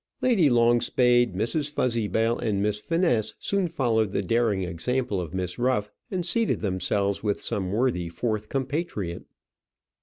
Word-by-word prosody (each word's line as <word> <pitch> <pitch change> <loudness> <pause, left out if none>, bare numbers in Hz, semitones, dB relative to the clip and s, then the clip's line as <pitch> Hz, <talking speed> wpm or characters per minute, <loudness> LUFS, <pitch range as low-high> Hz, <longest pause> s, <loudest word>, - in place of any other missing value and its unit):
Lady 210 - +3
Longspade, 120 -1 +3
Mrs. 130 - -1
Fuzzybell, 115 -3 0
and 105 -3 -1
Miss 105 +1 0
Finesse 165 - 0
soon 200 -2 0
followed 110 - 0
the 100 - 0
daring 110 -1 +1
example 100 +5 -1
of 85 - -6
Miss 90 +1 -3
Ruff, 120 -4 0 0.2
and 180 -3 -2
seated 225 +6 +1
themselves 100 +1 0
with 105 -2 -1
some 95 -2 -2
worthy 105 -6 0
fourth 110 +4 -3
compatriot. 135 - -3
115 Hz, 140 wpm, -26 LUFS, 100-130 Hz, 0.2 s, Lady